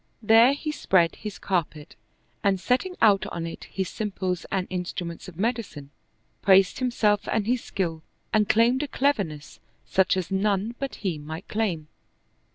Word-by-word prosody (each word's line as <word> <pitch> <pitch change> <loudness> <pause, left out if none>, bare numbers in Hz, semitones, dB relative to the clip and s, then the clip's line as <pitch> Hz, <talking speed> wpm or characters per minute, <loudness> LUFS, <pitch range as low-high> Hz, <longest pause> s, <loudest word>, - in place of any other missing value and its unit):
There 225 +5 +6
he 305 +2 -3
spread 180 - +2
his 210 -2 -7
cappet 160 -5 -3 0.5
and 195 -2 +2
setting 260 - 0
out 205 -3 +5
on 170 -1 -4
it 165 - -7
his 190 -2 -3
simples 190 -4 -3
and 190 -2 0
instruments 180 -2 -4
of 175 -3 -11
medicine, 200 - -3 0.5
praised 195 +2 +4
himself 220 -5 +1
and 215 -2 0
his 245 +2 0
skill 165 -4 -3 0.3
and 210 -1 +3
claimed 235 +4 +4
a 295 - -2
cleverness 200 - -1 0.3
such 190 0 +2
as 185 -1 -3
none 200 +3 0
but 275 -1 -4
he 170 -5 -1
might 160 +4 -8
claim. 185 -9 -2
195 Hz, 155 wpm, -25 LUFS, 175-225 Hz, 0.5 s, There